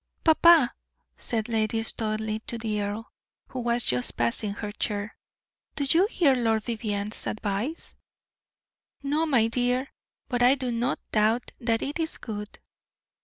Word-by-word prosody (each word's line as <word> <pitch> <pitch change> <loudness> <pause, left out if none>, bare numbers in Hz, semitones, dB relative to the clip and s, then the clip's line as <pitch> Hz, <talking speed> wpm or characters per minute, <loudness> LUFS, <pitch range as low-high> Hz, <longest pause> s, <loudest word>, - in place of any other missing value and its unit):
"Papa," 320 -4 +6 0.4
said 220 -2 -2
Lady 225 -1 0
Studleigh 215 -1 -2
to 235 - -1
the 215 -2 -2
earl, 205 +3 -4 0.4
who 260 - -5
was 240 0 +1
just 125 0 0
passing 120 - 0
her 205 0 -5
chair, 205 -1 -3 0.6
"do 285 - -1
you 345 +8 +4
hear 330 - +3
Lord 225 -3 +1
Vivianne's 215 -2 -2
advice?" 215 +9 -3 1.1
"No, 300 +4 +1
my 245 -7 +4
dear; 250 +3 0 0.3
but 245 -1 -1
I 250 +2 +6
do 255 -3 -3
not 240 +2 -1
doubt 220 +3 +2
that 230 -2 0
it 290 +4 -3
is 320 -1 -2
good." 210 -2 -7
230 Hz, 140 wpm, -26 LUFS, 215-255 Hz, 1.1 s, Papa